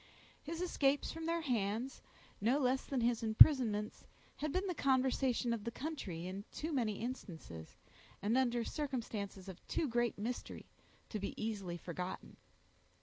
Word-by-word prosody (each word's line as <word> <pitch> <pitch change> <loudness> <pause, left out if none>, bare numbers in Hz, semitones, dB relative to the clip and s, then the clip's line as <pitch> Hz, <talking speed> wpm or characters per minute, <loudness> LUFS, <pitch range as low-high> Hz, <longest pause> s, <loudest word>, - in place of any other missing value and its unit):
His 330 +3 -4
escapes 285 -5 +2
from 325 0 -5
their 335 0 +1
hands, 235 -2 -1 0.4
no 235 +6 +3
less 265 -1 +2
than 265 -3 0
his 235 -1 +2
imprisonments, 220 -2 +6 0.3
had 305 -1 -2
been 370 +5 0
the 370 - -1
conversation 260 -4 +2
of 225 -3 -3
the 235 - -2
country 230 - -5
in 190 +2 -5
too 315 +1 -4
many 235 -6 +1
instances, 165 - -7 0.4
and 210 +4 +1
under 240 -2 +2
circumstances 225 - -4
of 185 -2 -9
too 315 - 0
great 240 -1 +1
mystery, 235 +4 -4 0.4
to 215 - -3
be 200 - -5
easily 200 -6 -3
forgotten. 180 +2 -6
240 Hz, 145 wpm, -36 LUFS, 205-275 Hz, 0.4 s, imprisonments